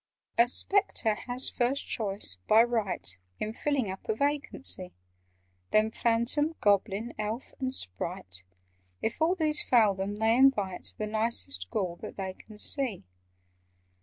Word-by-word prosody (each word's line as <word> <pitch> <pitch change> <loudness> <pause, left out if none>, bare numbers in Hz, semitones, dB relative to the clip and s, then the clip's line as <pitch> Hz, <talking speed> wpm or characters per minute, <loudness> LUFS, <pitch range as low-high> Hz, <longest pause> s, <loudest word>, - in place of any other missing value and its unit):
"A 235 +1 +5
Spectre 325 - +1
has 245 +4 -4
first 250 +3 +1
choice, 195 - 0
by 220 +2 +7
right, 225 - -1 0.3
In 215 - -3
filling 265 -5 -1
up 190 - -10
a 220 - +2
vacancy; 275 -8 -1 0.7
Then 215 +1 +3
Phantom, 235 +8 +1
Goblin, 205 +3 +1
Elf, 215 +4 -4
and 260 -1 -1
Sprite— 90 - -1 0.6
If 225 +7 -2
all 335 +3 +3
these 310 -4 +3
fail 220 -5 +4
them, 195 +2 -3
they 220 +2 +2
invite 215 -9 +2
The 215 - -2
nicest 210 - -1
Ghoul 175 - -2
that - - -9
they 190 -1 -4
can 215 +2 -15
see. 250 - 0
220 Hz, 135 wpm, -29 LUFS, 195-260 Hz, 0.7 s, by